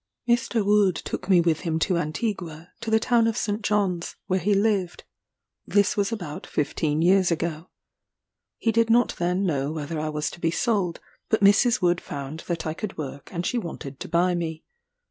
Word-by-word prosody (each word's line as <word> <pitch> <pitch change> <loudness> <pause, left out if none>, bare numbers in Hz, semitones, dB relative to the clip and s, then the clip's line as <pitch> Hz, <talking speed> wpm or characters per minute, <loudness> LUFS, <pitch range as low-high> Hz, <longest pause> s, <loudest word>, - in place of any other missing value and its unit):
Mr. 235 -2 +1
Wood 205 -3 +4
took 180 - -5
me 180 -3 +6
with 165 -2 +1
him 165 -3 -1
to 180 +3 +1
Antigua, 170 0 -3
to 230 - -4
the 220 0 +4
town 230 0 +3
of 225 - -1
St. 210 +1 -1
John's, 195 -5 0
where 185 0 +1
he 200 +4 +2
lived. 195 -4 0 0.6
This 205 -1 +3
was 200 +1 0
about 175 -9 -5
fifteen 150 +1 0
years 185 +1 +4
ago. 165 0 -2 0.9
He 230 - +1
did 230 +1 +2
not 240 +2 +4
then 180 +3 +1
know 145 -4 0
whether 155 0 -4
I 155 0 -2
was 150 0 -2
to - - -11
be 165 - +1
sold; 190 -2 0 0.3
but 220 - +2
Mrs. 210 +3 +4
Wood 175 0 +3
found 140 +2 -6
that 170 -2 -2
I 155 - -1
could 195 +4 -6
work, 140 -2 -6
and 175 -1 -3
she 245 - 0
wanted 150 - -7
to - - -7
buy 180 +1 +2
me. 160 -2 -3
180 Hz, 190 wpm, -25 LUFS, 160-210 Hz, 0.9 s, me